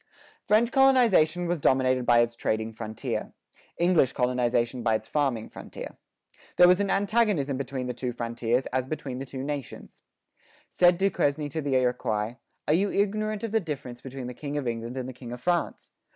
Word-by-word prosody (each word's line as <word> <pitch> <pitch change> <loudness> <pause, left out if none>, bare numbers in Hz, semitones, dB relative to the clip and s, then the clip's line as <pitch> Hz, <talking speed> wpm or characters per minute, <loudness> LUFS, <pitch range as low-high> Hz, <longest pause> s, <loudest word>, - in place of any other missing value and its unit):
French 230 +3 +3
colonization 230 - +4
was 170 -3 -1
dominated 130 -2 +2
by 120 -1 +6
its 120 0 -1
trading 110 -1 -2
frontier; 110 -1 -5 0.4
English 170 -6 +3
colonization 125 0 0
by 115 -1 +2
its 110 0 -4
farming 135 -7 0
frontier. - - -9 0.6
There 180 - +7
was 180 +1 +5
an 200 - 0
antagonism 200 - +1
between 130 -1 -4
the 125 - -3
two 125 +1 -3
frontiers 120 +1 -1
as 130 0 0
between 135 -4 -5
the 135 - -6
two 130 0 -6
nations. 145 -2 -6 0.7
Said 175 -1 +4
Duquesne 150 -6 0
to 160 +3 -3
the 140 -2 -1
Iroquois, 120 -3 0 0.3
"Are 150 - +3
you 195 +5 +2
ignorant 215 +1 -1
of 225 - -3
the 225 - +3
difference 140 - -6
between 130 -1 -7
the 125 - -5
king 145 +3 -5
of 140 -4 -2
England 115 +2 -4
and 130 -1 -3
the 130 - -7
king 120 -1 -10
of 125 - -6
France? 175 +5 -1
135 Hz, 180 wpm, -27 LUFS, 120-175 Hz, 0.7 s, There